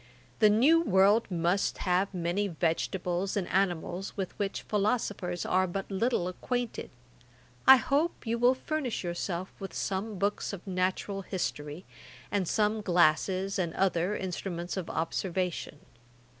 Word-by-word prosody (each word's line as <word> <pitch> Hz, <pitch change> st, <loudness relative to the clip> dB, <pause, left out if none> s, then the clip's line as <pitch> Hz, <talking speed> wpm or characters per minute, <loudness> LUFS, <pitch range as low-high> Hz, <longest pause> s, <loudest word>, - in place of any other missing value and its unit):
The 215 Hz, -, +6 dB
new 275 Hz, +11 st, +5 dB
world 205 Hz, -, +4 dB
must 175 Hz, +2 st, 0 dB
have 185 Hz, +2 st, +1 dB
many 180 Hz, +2 st, -1 dB
vegetables 180 Hz, +2 st, -1 dB
and 190 Hz, -, -1 dB
animals 185 Hz, 0 st, -1 dB
with 190 Hz, -2 st, -2 dB
which 200 Hz, -1 st, -2 dB
philosophers 205 Hz, -4 st, -1 dB
are 185 Hz, +1 st, +2 dB
but 195 Hz, +3 st, -5 dB
little 195 Hz, -2 st, +1 dB
acquainted. 245 Hz, +6 st, -3 dB, 0.8 s
I 265 Hz, -, +12 dB
hope 285 Hz, +6 st, 0 dB
you 230 Hz, +1 st, -1 dB
will 245 Hz, +2 st, +5 dB
furnish 265 Hz, -5 st, -3 dB
yourself 175 Hz, +1 st, -3 dB
with 195 Hz, -, -7 dB
some 200 Hz, +2 st, -2 dB
books 200 Hz, +2 st, -1 dB
of 190 Hz, -, -8 dB
natural 190 Hz, +1 st, -1 dB
history, 150 Hz, -2 st, -4 dB, 0.5 s
and 195 Hz, -3 st, 0 dB
some 215 Hz, +2 st, +1 dB
glasses 185 Hz, +2 st, +2 dB
and 170 Hz, -3 st, -1 dB
other 185 Hz, +1 st, +1 dB
instruments 175 Hz, -2 st, -4 dB
of 190 Hz, -4 st, -4 dB
observation. 175 Hz, 0 st, -2 dB
190 Hz, 130 wpm, -29 LUFS, 175-210 Hz, 0.8 s, I